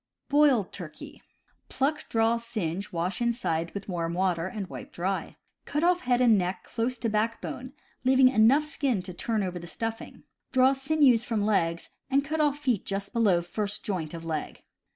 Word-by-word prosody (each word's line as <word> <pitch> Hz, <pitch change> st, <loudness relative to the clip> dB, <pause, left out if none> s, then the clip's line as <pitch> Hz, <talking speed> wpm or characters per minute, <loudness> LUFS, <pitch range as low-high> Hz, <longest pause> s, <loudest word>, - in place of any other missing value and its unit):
Boiled 285 Hz, -9 st, +4 dB
Turkey. 170 Hz, -5 st, -9 dB, 0.2 s
— -, -, -41 dB
Pluck, 300 Hz, +3 st, -1 dB
draw, 225 Hz, +1 st, +2 dB
singe, 200 Hz, -6 st, -4 dB
wash 180 Hz, +4 st, -2 dB
inside 200 Hz, -9 st, 0 dB
with 200 Hz, -, -5 dB
warm 170 Hz, -3 st, -2 dB
water, 180 Hz, -2 st, +1 dB
and 200 Hz, +1 st, -5 dB
wipe -, -, -9 dB
dry. 190 Hz, +3 st, -3 dB, 0.3 s
Cut 295 Hz, +2 st, -1 dB
off 355 Hz, +1 st, +4 dB
head 250 Hz, -3 st, +1 dB
and 230 Hz, -5 st, +5 dB
neck 180 Hz, +1 st, -2 dB
close 240 Hz, +2 st, -2 dB
to 230 Hz, -, -2 dB
backbone, 230 Hz, +4 st, -2 dB, 0.3 s
leaving 260 Hz, 0 st, +6 dB
enough 255 Hz, +5 st, +5 dB
skin 275 Hz, -9 st, -1 dB
to 185 Hz, 0 st, -7 dB
turn 220 Hz, +3 st, -1 dB
over 180 Hz, -1 st, -3 dB
the 170 Hz, -, -9 dB
stuffing. 225 Hz, +5 st, -5 dB, 0.3 s
Draw 260 Hz, +1 st, +5 dB
sinews 270 Hz, -4 st, +3 dB
from 220 Hz, -4 st, -1 dB
legs, 170 Hz, -6 st, 0 dB, 0.2 s
and 275 Hz, +1 st, +2 dB
cut 310 Hz, +2 st, -1 dB
off 290 Hz, -1 st, +2 dB
feet 255 Hz, -9 st, 0 dB
just 195 Hz, 0 st, -4 dB
below 200 Hz, -7 st, +3 dB
first 205 Hz, +3 st, -4 dB
joint 170 Hz, -5 st, -3 dB
of 165 Hz, 0 st, -8 dB
leg. 155 Hz, -2 st, -4 dB
225 Hz, 175 wpm, -27 LUFS, 180-255 Hz, 0.3 s, leaving